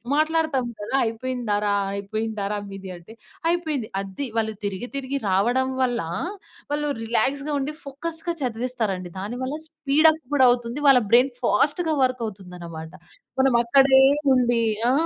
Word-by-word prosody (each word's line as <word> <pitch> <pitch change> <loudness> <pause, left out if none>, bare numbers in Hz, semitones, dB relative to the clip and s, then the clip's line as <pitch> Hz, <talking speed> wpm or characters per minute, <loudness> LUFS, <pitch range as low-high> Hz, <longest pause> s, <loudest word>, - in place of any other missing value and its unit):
మాట్లాడతాం 310 -4 +1
గదా! 205 +6 -3
అయిపోయిందారా? 225 -3 -1 0.2
అయిపోయిందారా 210 0 -3
మీది? 195 -1 -8
అంటే, 175 +6 -14 0.4
"అయిపోయింది." 315 -9 -1
అది. 195 +8 -5
వాళ్ళు 220 -1 -2
తిరిగి, 200 +4 -4
తిరిగి 275 +1 -3
రావడం 240 +8 +2 0.2
వల్ల 245 -3 0 0.7
వాళ్ళు 295 0 0 0.2
రిలాక్స్‌గా 270 +6 0
ఉండి, 280 +2 -3
ఫోకస్‌గా 325 +5 -4
చదివేస్తారండి. 245 -2 -1 0.3
దానివల్ల 245 +8 -4
స్పీడ్ 310 0 +3
అప్ 315 0 0
గూడా 265 -3 +5
అవుతుంది. 240 +2 0
వాళ్ళ 270 -2 +8
బ్రైన్ 250 +3 +5
ఫాస్ట్‌గా 335 -3 +2
వర్క్ 255 -1 0
అవుతుందనమాట. 175 -5 -8 0.5
మనం 265 -1 +4
అక్కడే 265 +2 +5 0.3
ఉండి 240 -2 +2 0.3
ఆ! - - +4
250 Hz, 130 wpm, -24 LUFS, 215-275 Hz, 0.7 s, వాళ్ళ